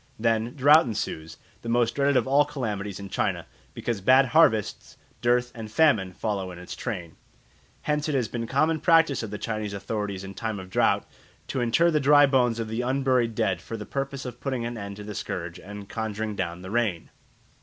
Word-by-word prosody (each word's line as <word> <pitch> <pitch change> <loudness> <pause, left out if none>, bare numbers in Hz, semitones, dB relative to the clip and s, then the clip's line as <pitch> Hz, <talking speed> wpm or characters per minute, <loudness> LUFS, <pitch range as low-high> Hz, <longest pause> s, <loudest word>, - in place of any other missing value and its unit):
Then 115 +1 0
drought 150 +2 +6
ensues, 80 -8 -4 0.2
the 115 - -6
most 120 0 +2
dreaded 140 -1 +2
of 125 - +2
all 140 +2 +4
calamities 105 -9 -4
in 100 - -7
China, - - -1 0.3
because 115 -5 -3
bad 130 +6 +6
harvests, 110 -10 +2 0.2
dearth, 125 +1 +2
and 110 -2 -8
famine 110 -9 +3
follow 100 -1 -3
in 90 - -9
its 90 0 -8
train. 90 -9 -5 0.7
Hence 150 0 0
it 150 - 0
has 125 -4 +1
been 115 +2 -4
a - - -9
common 155 +5 +2
practice 165 -5 +4
of 110 - -5
the 105 - -5
Chinese 110 -2 -3
authorities 100 -2 -4
in 95 0 -8
time 110 -1 -4
of 95 0 -10
drought - - +2 0.4
to 130 - -1
inter 140 +9 +3
the 155 - +2
dry 145 +1 +6
bones 125 -4 +2
of 115 - -2
the 110 +2 -2
unburied 130 -3 +1
dead 95 -6 0
for 115 - -6
the 105 - -7
purpose 135 +1 -4
of 125 -1 -8
putting 130 -4 -2
an 120 +1 -4
end 100 -2 -6
to 105 - -9
the 105 0 -6
scourge 85 -3 -5
and 100 +1 -9
conjuring 110 -1 -3
down 90 -2 -4
the 95 - -7
rain. 110 -8 -1
115 Hz, 205 wpm, -26 LUFS, 100-135 Hz, 0.7 s, drought